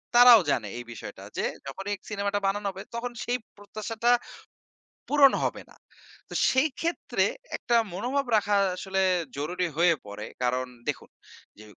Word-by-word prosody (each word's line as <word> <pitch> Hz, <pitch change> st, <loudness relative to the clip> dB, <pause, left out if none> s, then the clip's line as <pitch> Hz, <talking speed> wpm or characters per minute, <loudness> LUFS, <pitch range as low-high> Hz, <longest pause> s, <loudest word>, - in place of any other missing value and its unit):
তারাও 240 Hz, -2 st, +10 dB
জানে 110 Hz, -4 st, 0 dB
এই 120 Hz, -, -5 dB
বিষয়টা 115 Hz, -, -9 dB
যে, -, -, 0 dB, 0.2 s
যখনই 195 Hz, +9 st, -4 dB
সিনেমাটা 200 Hz, -1 st, -1 dB
বানানো 205 Hz, +1 st, -1 dB
হবে 190 Hz, 0 st, -9 dB
তখন 245 Hz, +1 st, -3 dB
সেই 245 Hz, +1 st, 0 dB, 0.2 s
প্রত্যাশাটা 215 Hz, +3 st, -1 dB, 1.0 s
পূরণ 285 Hz, -2 st, +6 dB
হবে -, -, -2 dB
না। -, -, -18 dB, 0.5 s
তো -, -, -8 dB, 0.2 s
সেই 260 Hz, +4 st, +3 dB
ক্ষেত্রে 335 Hz, +1 st, 0 dB, 0.3 s
একটা 240 Hz, -, 0 dB, 0.2 s
মনোভাব 255 Hz, +9 st, -1 dB
রাখা 205 Hz, -1 st, +2 dB, 0.2 s
আসলে 190 Hz, +1 st, -1 dB, 0.4 s
জরুরি 175 Hz, +5 st, -1 dB
হয়ে 170 Hz, 0 st, +5 dB
পড়ে। 100 Hz, +1 st, -7 dB, 0.2 s
কারণ 125 Hz, +1 st, +1 dB, 0.2 s
দেখুন -, -, -3 dB, 0.5 s
যে, 110 Hz, -, -12 dB
205 Hz, 145 wpm, -27 LUFS, 175-240 Hz, 1.0 s, তারাও